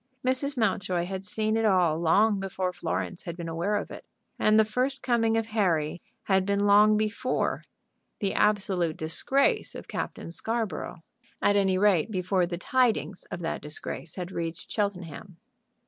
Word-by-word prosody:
Mrs. 260 +2 +1
Mountjoy 185 -6 0
had 190 +1 -5
seen 215 +2 -1
it 225 - +1
all 180 -6 +3
long 200 +5 +3
before 190 -1 -3
Florence 180 0 -4
had 170 0 -6
been 170 -1 -5
aware 170 +6 -1
of 205 - -3
it. - - -9 0.4
And 215 0 +4
the 220 - +5
first 255 +5 -2
coming 230 -2 +2
of 225 - 0
Harry 175 -7 0 0.2
had 190 -1 +2
been 200 +1 0
long 210 +1 +6
before 215 +4 -1 0.6
the 200 -3 -1
absolute 190 -6 +1
disgrace 175 +13 +1
of - - -8
Captain - - -5
Scarborough, 220 -3 -2 0.4
at 205 - +3
any 190 -2 +3
rate, 195 -2 +3
before 185 -2 0
the 175 0 -4
tidings 230 -2 0
of - - -6
that 165 - -3
disgrace 150 +2 -6
had 180 -1 -5
reached 165 -2 -5
Cheltenham. 185 -3 -4
195 Hz, 160 wpm, -27 LUFS, 175-215 Hz, 0.6 s, long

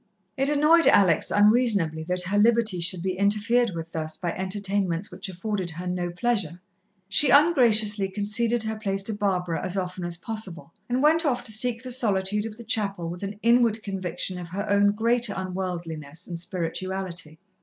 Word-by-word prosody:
It 270 +1 +1
annoyed 300 +3 +4
Alex 180 -6 +4
unreasonably 205 -7 +3
that 180 +1 0
her 195 +3 -1
liberty 220 -3 +3
should 175 +1 -1
be 185 -1 -2
interfered 215 +5 +2
with 165 0 -6
thus 155 -1 -4
by 175 -2 -3
entertainments 190 -1 -2
which 190 +2 -3
afforded 190 0 -4
her 170 +3 -7
no 180 -1 -2
pleasure. 180 -3 -1 0.5
She 265 +8 +4
ungraciously 225 - +4
conceded 215 +4 0
her 220 0 -3
place 195 -2 -1
to 220 - -1
Barbara 185 -5 -2
as 185 +1 -3
often 185 -1 -4
as 175 -1 -2
possible, 180 -4 -6 0.2
and 250 +3 0
went 320 +3 +4
off 265 -6 0
to - - +4
seek 230 +2 0
the 255 - -6
solitude 210 -3 0
of 215 -1 -10
the 235 - -10
chapel 200 -7 -1
with 175 +1 -7
an 200 +1 -5
inward 235 -2 +3
conviction 185 -1 -3
of 175 - -7
her 200 +4 -4
own 205 0 +3
great 235 +2 +1
unworldliness 180 -5 -5
and 170 -2 -6
spirituality. 175 -1 -4
200 Hz, 175 wpm, -25 LUFS, 180-225 Hz, 0.5 s, annoyed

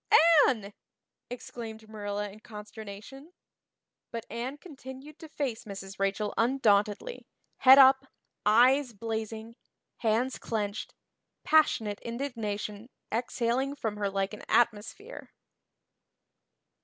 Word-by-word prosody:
"Anne!" 210 -6 -2 0.6
exclaimed 225 -2 -8
Marilla 205 -1 -4
in 210 - -14
consternation. 215 - -10 0.8
But 230 0 -6
Anne 245 +5 -4
continued 280 -2 -11
to 320 - -11
face 265 -7 -3
Mrs. 195 -1 -8
Rachel 195 +2 0
undauntedly, 225 - +1 0.3
head 265 0 +9
up, 265 0 +7 0.4
eyes 250 +4 +4
blazing, 225 +1 -5 0.4
hands 235 +3 0
clenched, 210 -2 -3 0.5
passionate 225 -10 +3
indignation 230 -3 -4 0.2
exhaling 240 +3 -1
from 220 -6 -3
her 205 -1 -1
like 195 +1 -2
an 210 - -8
atmosphere. 235 - 0
225 Hz, 95 wpm, -29 LUFS, 210-265 Hz, 0.8 s, head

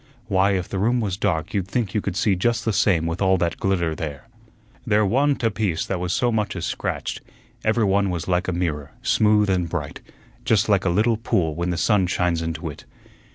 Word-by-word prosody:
Why, 100 -1 +2
if 90 -2 -1
the 95 - -3
room 120 +5 +2
was 100 -5 -1
dark 90 -5 -1
you'd 95 -3 -1
think 105 -1 -2
you 105 - +1
could 100 -3 -3
see 100 0 +2
just 115 +5 0
the 110 - +1
same 95 -5 +2
with 85 +3 -3
all 95 -1 +4
that 85 -1 -1
glitter 85 -4 0
there. 75 -4 -6 0.6
There 105 0 +2
wa'n't 135 +6 +1
a 115 - +2
piece 100 -6 -1
that 95 - -2
was 90 0 -2
so 120 +4 +1
much 105 -2 -1
as - - -3
scratched; - - -3 0.4
every 110 0 +2
one 100 0 +2
was 85 -3 -3
like 90 0 0
a - - 0
mirror, 80 -5 -3
smooth 105 -1 +3
and 90 -3 0
bright, 80 -4 -4 0.4
just 110 -1 +2
like 100 -3 +2
a - - +3
little 110 +6 +2
pool 95 -8 0
when 85 +3 -2
the 85 - -1
sun 100 0 +2
shines 90 -2 0
into 80 +1 -4
it. 75 - -8
95 Hz, 220 wpm, -23 LUFS, 85-105 Hz, 0.6 s, all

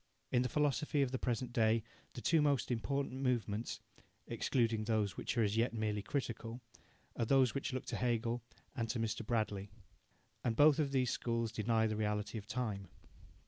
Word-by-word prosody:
In 125 - +4
the 125 - 0
philosophy 145 0 +2
of 130 - -1
the 130 - -2
present 120 0 -1
day 110 -1 +3 0.3
the 120 - -6
two 165 +3 +4
most 140 -4 +2
important 135 +2 -1
movements 115 -4 -1 0.5
(excluding 115 -4 +1
those 105 -5 +1
which - - -3
are 115 - +4
as 105 0 +1
yet 115 0 +2
merely 105 -2 0
critical) 115 0 -3 0.6
are 115 - 0
those 130 0 +4
which 140 - -2
look 130 0 -3
to - - -3
Hegel 120 0 0 0.3
and 115 -1 -2
to 120 - -1
Mr. 115 0 -1
Bradley. 105 -3 -1 0.7
And 115 - +1
both 150 +3 +6
of 145 -3 +1
these 130 -2 +2
schools 115 -2 -1
deny 110 0 +2
the 110 -1 0
reality 105 +1 -1
of 100 - -13
time. 110 -5 -2
115 Hz, 180 wpm, -36 LUFS, 110-130 Hz, 0.7 s, both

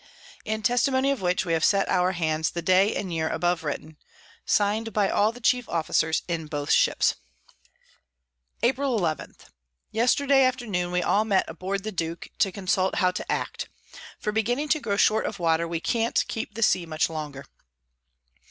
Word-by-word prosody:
In 220 0 -3
Testimony 260 +3 +2
of 275 - -2
which, 180 +1 0
we 165 - 0
have 165 0 +1
set 200 -1 +3
our 180 0 +2
Hands 160 -2 0
the 170 - -5
Day 185 +4 +3
and 185 -4 -3
Year 160 -1 -1
above 175 -1 0
written._ 150 +1 -5 0.5
Sign'd 215 +2 +1
by 205 -2 +2
all 210 +2 +3
the 240 - -12
chief 245 +1 +1
Officers 160 -1 0
in 165 -3 -3
both 145 -2 -3
Ships. - - +3 1.5
April 260 0 +1
11. 165 -6 -2 0.6
Yesterday 270 +4 +3
afternoon 220 -9 -1
we 180 0 0
all 210 - +2
met 200 -3 +2
aboard 190 +4 -4
the 215 - -4
Duke, 165 -2 -4
to 200 -3 +3
consult 185 -1 0
how 180 -1 +2
to - - -5
act; - - -3 0.5
for 210 - -2
beginning 245 +7 -1
to 310 - +3
grow 200 -7 -2
short 215 +1 +3
of - - -5
Water, 165 -1 +1
we 165 0 -3
can't 230 +6 0
keep 220 -1 -5
the 230 - -1
Sea 180 -4 +2
much 160 0 0
longer. 150 -3 -6
190 Hz, 170 wpm, -25 LUFS, 165-225 Hz, 1.5 s, set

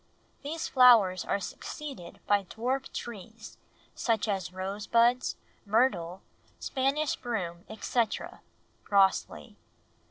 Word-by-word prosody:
These 315 +3 -4
flowers 230 -8 +6
are - - 0
succeeded 255 - -8
by 205 -1 +2
dwarf 255 +7 -3
trees, 220 0 -8 0.3
such 225 -2 0
as 190 -4 -2
rose 195 +3 -5
buds, 235 +2 +3 0.3
myrtle, 200 -5 +1 0.3
Spanish 275 +3 0
broom, 180 -8 -4
etc." 220 +1 -2 0.4
(Grosley.) 190 - +1
220 Hz, 95 wpm, -29 LUFS, 190-250 Hz, 0.4 s, flowers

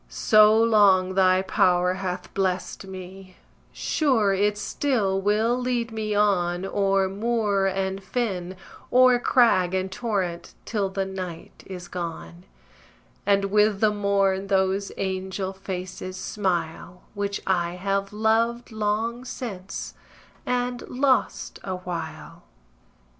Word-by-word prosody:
So 215 -1 +5
long 200 -5 +4
Thy 185 0 +4
power 180 -1 +2
hath 185 -1 -5
blest 190 0 -2
me, 185 0 -10 0.3
sure 240 -10 +1
it 205 +2 +1
still 205 -3 0
Will 215 +4 +2
lead 245 -2 -1
me 215 -1 -2
on 185 -3 +1
O'er 195 -1 +1
moor 205 -1 0
and 190 0 -2
fen, 190 -6 -3 0.4
o'er 250 -1 +6
crag 190 -8 +3
and 190 0 -2
torrent, 190 -6 -3
till 205 -4 -1
The 195 0 -2
night 185 -3 -7
is 180 -2 -8
gone, 175 0 -7 0.8
And 200 -1 +3
with 210 -1 +3
the 215 0 +3
morn 200 -1 +1
those 195 0 +1
angel 190 0 -3
faces 185 -1 -6
smile, 180 -2 -3
Which 200 -1 -2
I 175 -2 0
have 195 +1 -2
loved 225 +3 +1
long 220 +3 -1
since, 200 -7 -6 0.5
and 245 0 -1
lost 260 0 0
a 190 -1 -3
while. 165 -2 -7
195 Hz, 115 wpm, -25 LUFS, 185-215 Hz, 0.8 s, o'er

